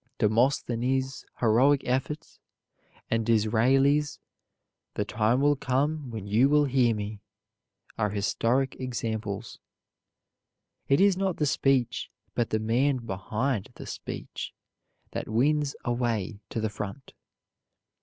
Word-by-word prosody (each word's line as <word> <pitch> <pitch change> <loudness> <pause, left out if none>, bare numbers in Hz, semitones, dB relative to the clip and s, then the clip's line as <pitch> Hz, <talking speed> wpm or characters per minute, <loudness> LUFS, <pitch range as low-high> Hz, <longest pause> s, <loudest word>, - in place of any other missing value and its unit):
Demosthenes' 125 +3 +1 0.2
heroic 130 +5 +4
efforts, 130 +4 -2 0.7
and 115 0 +2
Disraeli's 125 +7 +3 0.8
"The 105 - -1
time 110 +5 +1
will 145 +1 +4
come 140 +2 -1
when 110 -4 -6
you 110 +7 +4
will 150 0 +4
hear 125 -4 +3
me," 105 0 -5 0.8
are 105 - +2
historic 115 +6 0
examples. 110 -4 -4 1.3
It 140 - +4
is 195 -1 +5
not 190 -2 0
the 150 - +1
speech, 135 -4 +1 0.2
but 120 - 0
the 110 - +1
man 120 +4 +1
behind 105 +3 -2
the - - -9
speech, - - -6 0.6
that - - -4
wins 145 +5 +2
a 120 - +1
way 115 -4 -2
to - - -3
the 110 0 0
front. 105 +6 -7
120 Hz, 115 wpm, -27 LUFS, 110-135 Hz, 1.3 s, is